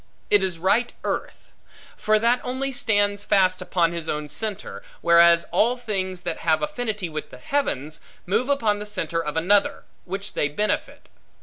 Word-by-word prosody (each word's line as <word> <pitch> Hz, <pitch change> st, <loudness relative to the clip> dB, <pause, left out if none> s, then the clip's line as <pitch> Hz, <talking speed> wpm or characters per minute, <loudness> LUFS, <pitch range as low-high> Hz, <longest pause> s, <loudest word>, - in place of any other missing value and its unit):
It 205 Hz, -2 st, +5 dB
is 185 Hz, -3 st, -1 dB
right 205 Hz, +8 st, +2 dB
earth. -, -, -4 dB, 0.4 s
For 215 Hz, 0 st, +2 dB
that 235 Hz, +3 st, +2 dB
only 260 Hz, +2 st, -2 dB
stands 205 Hz, -4 st, +1 dB
fast 185 Hz, -2 st, +3 dB
upon 175 Hz, -2 st, +1 dB
his 170 Hz, -2 st, -4 dB
own 150 Hz, 0 st, -3 dB
centre; 210 Hz, +1 st, -4 dB, 0.2 s
whereas 170 Hz, 0 st, +6 dB
all 240 Hz, +3 st, +2 dB
things, 190 Hz, -6 st, -3 dB
that 170 Hz, -2 st, -4 dB
have 160 Hz, -1 st, +1 dB
affinity 245 Hz, -10 st, -3 dB
with 155 Hz, -2 st, -6 dB
the -, -, -12 dB
heavens, 155 Hz, -, -2 dB, 0.3 s
move 220 Hz, +8 st, 0 dB
upon 225 Hz, -7 st, +1 dB
the 210 Hz, -, -5 dB
centre 165 Hz, -5 st, -2 dB
of 150 Hz, +1 st, -4 dB
another, 195 Hz, +5 st, +2 dB, 0.2 s
which 195 Hz, +2 st, -5 dB
they 145 Hz, -, +1 dB
benefit. 210 Hz, +9 st, -2 dB
200 Hz, 165 wpm, -24 LUFS, 170-220 Hz, 0.4 s, whereas